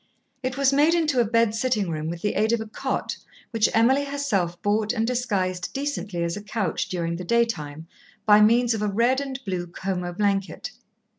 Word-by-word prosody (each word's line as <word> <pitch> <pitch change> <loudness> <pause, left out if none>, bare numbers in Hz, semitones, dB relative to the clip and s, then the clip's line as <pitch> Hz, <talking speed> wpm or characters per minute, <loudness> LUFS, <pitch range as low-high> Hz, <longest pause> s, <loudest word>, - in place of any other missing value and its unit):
It 255 0 -3
was 275 0 +3
made 300 +4 +4
into 305 -6 +1
a - - +5
bed 230 0 +2
sitting 220 -5 0
room 155 0 -3
with 170 0 -6
the 205 - +1
aid 220 +2 +2
of 235 - +2
a 220 - -4
cot 215 - -3 0.3
which 225 -2 +2
Emily 260 +5 +3
herself 210 -12 -1
bought 210 +2 +1
and 225 -2 0
disguised 195 -7 -1
decently 215 -11 -3
as 170 0 -1
a 205 - -6
couch 210 -3 -2
during 170 -2 -2
the 180 - -6
daytime, 170 -9 -1 0.4
by 210 0 +7
means 235 +2 +4
of 220 - -3
a 210 - +1
red 235 +6 +2
and 270 -1 -5
blue 180 -3 -3
Como 180 0 -3
blanket. 195 0 -1
215 Hz, 195 wpm, -24 LUFS, 185-245 Hz, 0.4 s, by